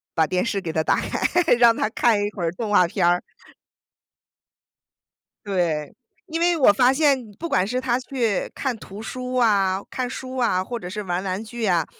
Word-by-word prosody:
把 160 - +3
电 180 +3 0
视 225 -4 -1
给 175 -4 -4
他 160 - 0
打 - - +2
开， 355 - 0 0.2
让 235 -1 +6
他 - - 0
看 225 -1 +2
一 205 - -1
会 190 - -6
儿 165 - 0
动 210 +5 -5
画 180 -4 +5
片 175 0 +1
儿。 175 0 +3 2.2
对， 170 -7 -1 0.3
因 330 -2 -3
为 345 0 +3
我 260 -9 +6
发 245 +5 +4
现 285 -1 +3 0.2
不 335 - -4
管 185 - +1
是 250 +4 -2
他 250 -1 0
去 245 -6 -2
看 265 -4 -2
图 205 -1 -10
书 255 +2 -5
啊、 200 -5 +2
看 255 -2 -3
书 255 +1 -7
啊， 235 -7 +1
或 240 +5 -5
者 180 - -8
是 210 +3 -5
玩 180 0 -3
玩 190 +2 -3
具 225 +1 -6
啊， 175 -6 +2
215 Hz, 210 characters per minute, -23 LUFS, 185-250 Hz, 2.2 s, 让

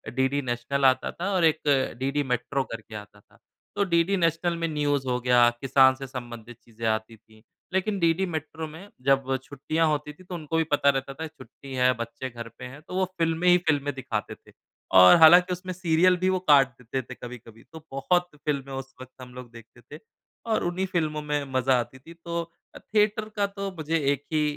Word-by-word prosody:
DD 130 +2 +1
national 130 +2 -1
आता 130 0 +3
था 180 +3 -4
और 180 -3 +3
एक 160 -1 +3 0.4
डीडी 140 +2 0
मैट्रो 135 +2 -1
करके 115 -1 -8
आता 105 0 -10
था। - - -26 0.4
तो 205 - +2
डीडी 175 +2 +2
नैशनल 170 0 +1
में 165 0 -1
न्यूज़ 145 -3 -1
हो 125 -1 0
गया 120 -1 +5
किसान 130 0 +5
से 135 0 -8
संबंधित 120 -2 -9
चीज़ें 115 0 -8
आती 110 +1 -2
थी। 110 +1 -23 0.3
लेकिन 195 +1 0
डीडी 170 +3 +2
मैट्रो 160 -1 -5
में 165 +6 -11 0.2
जब 135 -1 +2
छुट्टियाँ 155 +4 -1
होती 150 0 -2
थी 185 +4 -18
तो 180 0 -7
उनको 165 -1 -3
भी 165 - +3
पता 145 -1 +3
रहता 135 0 -1
था 160 +4 -6
छुट्टी 135 -1 -13
है 125 0 +4
बच्चे 115 +3 -6
घर 120 -1 -8
पे 125 - -7
हैं 135 +4 -10
तो - - -7
वो 185 0 +2
फ़िल्में 165 +1 0
ही 180 - +7
फ़िल्में 145 -2 +1
दिखाते 120 -5 -4
थे। - - -22 0.5
और 90 0 +9
हालाँकि 175 +3 +8
उसमें 185 +1 -6
सीरियल 175 0 +3
भी 185 +1 +1
वो 185 0 +1
काट 145 -7 +5
देते 130 +3 -3
थे 120 - -10
कभी-कभी 115 -2 -11
तो 160 - -8
बहुत 175 +7 +1 0.2
फ़िल्में 140 -2 -2
उस 135 0 -7
वक़्त 130 0 -11
हम 125 -1 -11
लोग 125 -1 -10
देखते 115 +1 -15
थे 145 +6 -12 0.5
और 220 - +1
उन्हीं 175 +2 -1
फ़िल्मों 155 -4 -1
में 150 -1 -2
मज़ा 130 0 +3
आती 130 +2 -6
थी। 165 +5 -14
तो 170 0 -4 0.3
अ, - - -9
थियेटर 215 +1 +1
का 205 -1 +1
तो 195 0 -3
मुझे 160 +1 -1 0.2
एक 140 0 -7
ही 155 -1 +2
145 Hz, 210 wpm, -26 LUFS, 125-170 Hz, 0.5 s, और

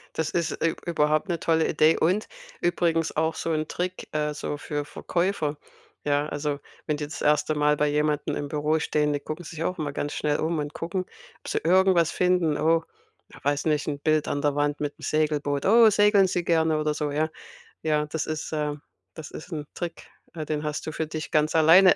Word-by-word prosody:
Das 160 -1 -1
ist, 170 -2 0
äh, 165 - +4
ü - - -5
überhaupt 155 +2 +1
'ne 170 -2 -1
tolle 160 -1 +2
Idee 155 +1 +4
und 185 +6 +1 0.3
übrigens 165 -2 +1
auch 160 +1 +1
so - - -3
'n 155 -1 -1
Trick, 180 +1 -4
äh, 150 0 0
so 145 - -4
für 145 0 -4
Verkäufer, 170 -1 -1 0.5
ja? 145 0 +1
Also, 145 -1 -2 0.3
wenn 150 -3 0
die 150 - -3
das 150 - -7
1. 150 +1 +2
Mal 150 0 +3
bei 150 0 +2
jemandem 150 0 0
im 145 - -3
Büro 150 +2 +1
stehen, 150 0 +1
die 145 - -1
gucken 155 +4 -6
sich 160 -1 -6
auch 180 +1 -2
immer 150 -2 -2
ganz 145 +1 -3
schnell 150 -1 0
um 160 +1 0
und 145 0 -3
gucken, 180 +3 -3 0.4
ob - - -11
sie - - 0
irgendwas 180 -1 +4
finden. 180 -4 +2
Oh, 160 +2 +3 0.5
ja - - -12
weiß 145 +2 0
nicht, 150 -2 +1
'n 145 -2 -2
Bild 155 0 +1
an 145 - -1
der 145 -1 +2
Wand 145 0 0
mit 145 -1 -2
'm - - -16
Segelboot. 150 -2 0
„Oh, 225 +2 +7
segeln 205 -1 +5
Sie 180 -1 -1
gerne?“ 160 -2 +2
oder 150 0 0
so, 150 -1 -2
ja? 155 +2 0 0.5
Ja, 150 -1 +1
das 155 +1 -3
ist, 155 0 -4
äh 150 -1 -1 0.4
das 160 -2 -9
ist 155 - -9
'n 150 -3 -4
Trick, 170 -1 -6 0.3
äh, 155 -2 -4
den 150 0 -2
hast 150 0 -3
du 155 - -3
für 160 0 -3
dich 155 0 -5
ganz 155 +1 +2
alleine 170 +4 +7
155 Hz, 215 wpm, -26 LUFS, 150-165 Hz, 0.5 s, Oh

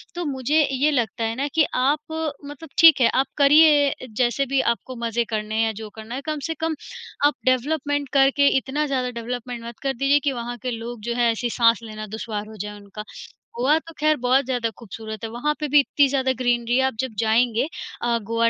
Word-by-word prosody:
तो 350 - -3
मुझे 285 +2 +1
ये 280 +3 +2
लगता 230 -4 -1
है 225 0 -1
ना 280 +2 -1
कि 315 - +5
आप 280 +4 +2 0.5
मतलब 290 +2 -10
ठीक 325 -5 +8
है, 235 - +6
आप 265 - +1
करिए 290 -2 +5
जैसे 250 +2 +1
भी 270 +1 0
आपको 250 +2 -2
मज़े 230 +1 0
करने 215 -1 -3
हैं 225 - +2
या 225 - 0
जो 220 -1 -7
करना 220 +2 -8
है, 270 - -4
कम 305 -1 -2
से 325 - -2
कम 320 0 -1 0.5
आप 290 - +4
डेवलपमेंट 285 +2 0
करके 275 +1 +4
इतना 280 +3 -1
ज़्यादा 255 -2 -1
डेवलपमेंट 240 0 -6
मत 235 -1 -9
कर 270 -1 0
दीजिए 275 +3 +2
कि 280 0 -1
वहाँ 240 -1 -5
के 250 +2 -4
लोग 230 0 -6
जो - - 0
हैं 240 -1 +3
ऐसी 240 +1 -2
साँस 230 -2 +3
लेना 215 -1 -7
दुश्वार 215 0 -5
हो 220 - -11
जाए 210 0 -5
उनका। 205 +1 -9 0.5
गोवा 275 +6 +3
तो 330 0 -14
खैर 305 0 +3
बहुत 255 +2 +3
ज़्यादा 245 -3 -1
खूबसूरत 220 -1 -8
है, 225 - -3
वहाँ 245 +6 -1
पे 300 - -2
भी 295 +1 +5
इतनी 285 0 +3
ज़्यादा 260 -1 0
ग्रीनरी 240 -1 +1
है। 265 - +3
आप 265 - 0
जब 260 -3 -2
जाएँगे 230 +3 +2 0.3
अ, 240 -1 +1
गोवा 230 +2 +1
250 Hz, 215 wpm, -23 LUFS, 230-280 Hz, 0.5 s, ठीक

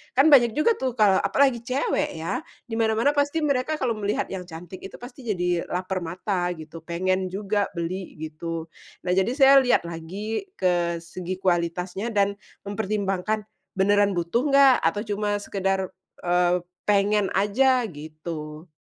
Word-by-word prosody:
Kan 280 +4 +5
banyak 240 -5 +6
juga 305 +10 +3
tuh 260 -2 -2
kalau 205 -4 +4
apalagi 270 -4 +2
cewek 255 -3 -1
ya, 160 +1 -2 0.2
di 225 - -6
mana-mana 225 +5 +3
pasti 290 +2 0
mereka 280 +1 +1
kalau 255 -3 0
melihat 205 -1 -2
yang 180 -2 -5
cantik 175 +2 -9
itu 195 - -9
pasti 245 0 -11
jadi 180 -4 0
lapar 185 +1 -2
mata 180 +2 -2
gitu, 155 +1 -10
pengen 185 +2 -1
juga 200 +2 -1
beli 175 +2 -4
gitu. 160 +1 -5 0.3
Nah 180 - -1
jadi 190 +5 +2
saya 275 -1 +7
lihat 250 -8 +3
lagi 190 - -5
ke 175 -2 +1
segi 180 +2 -5
kualitasnya 180 +3 -1
dan 200 0 +1 0.3
mempertimbangkan, 205 0 -1 0.3
beneran 200 +1 +3
butuh 175 - 0
enggak 275 -2 +6
atau 205 - +1
cuma 205 -1 -2
sekedar, 195 -1 -1 0.3
eee, 180 0 +2 0.2
pengen 205 0 +3
aja 250 +6 +3
gitu. 155 +1 -8
195 Hz, 145 wpm, -25 LUFS, 175-225 Hz, 0.3 s, saya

